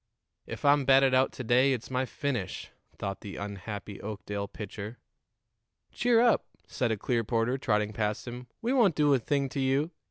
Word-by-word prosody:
"If - - -6
I'm 145 0 +5
batted 135 0 +5
out 130 +1 +4
to 130 - -6
day 125 +4 +4
it's 125 +1 -5
my 130 0 0
finish," 125 -12 -3 0.3
thought 100 -1 -4
the 100 - -7
unhappy 100 0 -6
Oakdale 100 -1 -4
pitcher. 105 +3 -7 0.9
"Cheer 240 -1 +3
up," 240 -1 +3 0.2
said 120 -3 -1
a 110 - 0
Clearporter, 115 +3 0
trotting 105 -3 +1
past 105 +2 -2
him. 125 +1 -7 0.2
"We 240 +3 +1
won't 220 - +4
do 145 -2 +4
a 135 - +3
thing 140 +4 0
to 140 - -4
you. 135 +5 +1
125 Hz, 170 wpm, -29 LUFS, 105-135 Hz, 0.9 s, I'm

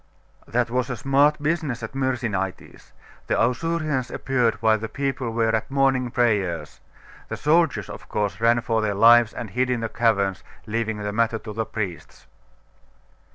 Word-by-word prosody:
'That 120 0 0
was 125 +1 0
a 125 - -3
smart 140 +5 +3
business 150 -7 -1
at 110 - -5
Myrsinitis. 120 -8 -3 0.4
The - - +1
Ausurians 135 +2 0
appeared 125 -4 0
while 110 0 +2
the 110 +1 -5
people 135 -2 -2
were 115 0 +1
at 110 - -3
morning 135 -2 +2
prayers. 95 - 0 0.5
The - - -4
soldiers, 165 +1 +2
of - - -10
course, 105 +1 -2
ran 120 +1 +4
for 115 -1 0
their 105 -2 -1
lives, 115 +2 +6
and 110 - -7
hid 125 +5 0
in 125 -2 0
the 115 - -2
caverns, 100 -5 +1 0.2
leaving 110 0 -2
the 105 0 -3
matter 115 +1 +1
to 110 0 -8
the 110 +1 -3
priests. 100 -6 -6
115 Hz, 160 wpm, -23 LUFS, 110-130 Hz, 0.5 s, lives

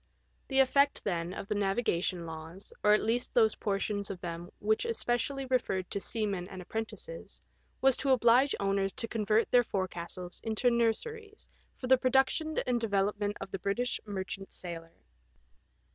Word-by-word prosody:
The 270 - -1
effect, 280 +2 +3
then, 175 -3 -1
of 190 - -5
the - - 0
navigation 195 -4 0
laws, 160 +4 -8
or 210 - +6
at 210 - +3
least 235 +3 0
those 220 -3 +5
portions 200 0 -2
of 195 -3 -5
them 170 0 -6
which 215 +1 +1
especially 275 - -1
referred 240 -8 0
to 200 - -1
seamen 200 -4 -2
and 190 -1 -8
apprentices, 225 - -6 0.4
was 265 -1 +5
to 275 - -1
oblige 255 +2 +5
owners 195 -1 +1
to 230 - -3
convert 215 0 +1
their 245 0 +6
forecastles 180 -3 -4
into 225 +2 +2
nurseries 415 - -1 0.3
for - - -6
the 260 0 +5
produc 265 +1 +4
tion 315 0 -3
and 245 -2 +1
development 205 -1 0
of - - -7
the 195 - -3
British 220 +7 -1
merchant 195 -1 -5
sailor. 165 -2 -7
210 Hz, 160 wpm, -31 LUFS, 190-245 Hz, 0.4 s, or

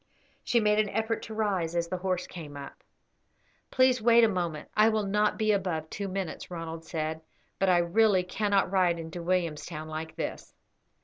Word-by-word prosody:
She 240 - +2
made 210 -1 +3
an 215 -1 +2
effort 220 +2 -1
to 220 - -8
rise 190 -6 -1
as 170 0 0
the 185 - -2
horse 180 -1 -1
came 150 -5 -9
up. 140 -1 -10 0.9
"Please 255 -2 +3
wait 235 +1 +6
a - - +7
moment; 175 -6 -3
I 215 +1 +6
will 215 -2 0
not 210 +2 +1
be 215 -1 +2
above 175 -6 -1
two 200 -1 -4
minutes," 190 -3 -4
Ronald 165 -2 -6
said; 160 -1 -3 0.4
"but 195 - +3
I 180 - +5
really 185 +2 +3
cannot 200 0 0
ride 180 -3 +3
into 165 +1 -6
Williamstown 170 -3 -2
like 155 +1 -6
this." - - -5
185 Hz, 180 wpm, -28 LUFS, 165-210 Hz, 0.9 s, a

